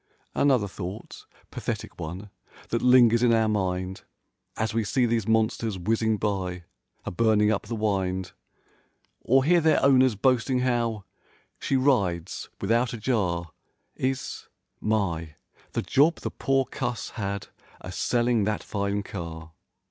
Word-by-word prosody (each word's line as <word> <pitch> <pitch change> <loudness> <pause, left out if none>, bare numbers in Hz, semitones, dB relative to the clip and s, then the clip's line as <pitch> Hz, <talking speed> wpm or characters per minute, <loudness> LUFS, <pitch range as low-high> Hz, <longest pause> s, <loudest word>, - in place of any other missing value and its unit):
44 - - -1
Another 130 -7 +3
thought 95 +1 -8 0.3
(pathetic - - -5
one) 90 +6 -6 0.4
that 115 - 0
lingers 120 -2 +6
in 120 -1 +4
our 110 -1 +3
mind 95 -3 -1 0.6
As 110 -1 -1
we 115 0 +1
see 125 +4 +1
these 115 -3 0
monsters 110 -1 +1
whizzing 110 +3 +1
by 95 -4 -2 0.4
a - - -3
burning 105 +2 +3
up 100 -1 -2
the 115 - -3
wind, 95 -4 -1 0.9
Or 135 +2 +3
hear 170 +4 +4
their 160 0 +4
owners 130 -3 +5
boasting 130 +3 +2
how 120 -4 0 0.6
"she 135 - -1
rides 100 - 0
with¬ 100 - -2
out 120 +2 +2
a - - -4
jar," 90 -8 -1 0.4
Is: 130 +1 -3 0.3
"My, 85 -8 -1 0.4
the - - -1
job 155 +5 +3
the - - -3
poor 135 0 +1
cuss 120 -2 -4
had 100 -3 -4 0.3
a 90 - -7
selling 120 +3 +1
that 105 0 -1
fine 100 0 -2
car!" 85 -4 -7
110 Hz, 140 wpm, -26 LUFS, 95-125 Hz, 0.9 s, lingers